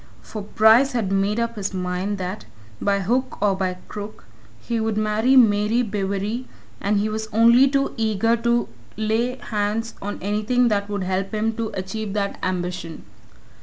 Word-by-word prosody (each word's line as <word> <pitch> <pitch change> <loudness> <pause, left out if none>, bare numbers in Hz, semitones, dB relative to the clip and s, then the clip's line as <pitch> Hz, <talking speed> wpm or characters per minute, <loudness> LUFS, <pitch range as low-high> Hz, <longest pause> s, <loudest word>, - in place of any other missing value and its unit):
For 215 - -7
Bryce 220 +6 +4
had 220 -6 -1
made 200 +3 +1
up 235 -1 -2
his 200 -1 -3
mind 185 +2 -2
that, 185 +2 -5 0.4
by 200 -1 +1
hook 250 +7 -1
or 200 -1 +2
by 185 -1 -2
crook, 210 0 -8 0.3
he 235 -1 -2
would 220 -1 -1
marry 215 +4 +2
Mary 220 0 +4
Bewery, 205 +3 -2 0.3
and 205 +1 +1
he 205 +1 +1
was 220 0 -3
only 235 +4 +6
too 275 0 0
eager 225 +1 +2
to 235 +1 +1 0.3
lay 220 +3 0
hands 220 -1 -2
on 205 +1 -4
anything 215 +5 +1
that 200 -1 0
would 205 -2 -2
help 190 +3 -2
him 220 +1 0
to 225 -1 -2
achieve 195 +2 -4
that 200 -1 -2
ambition. 180 -3 -3
210 Hz, 165 wpm, -23 LUFS, 200-230 Hz, 0.4 s, only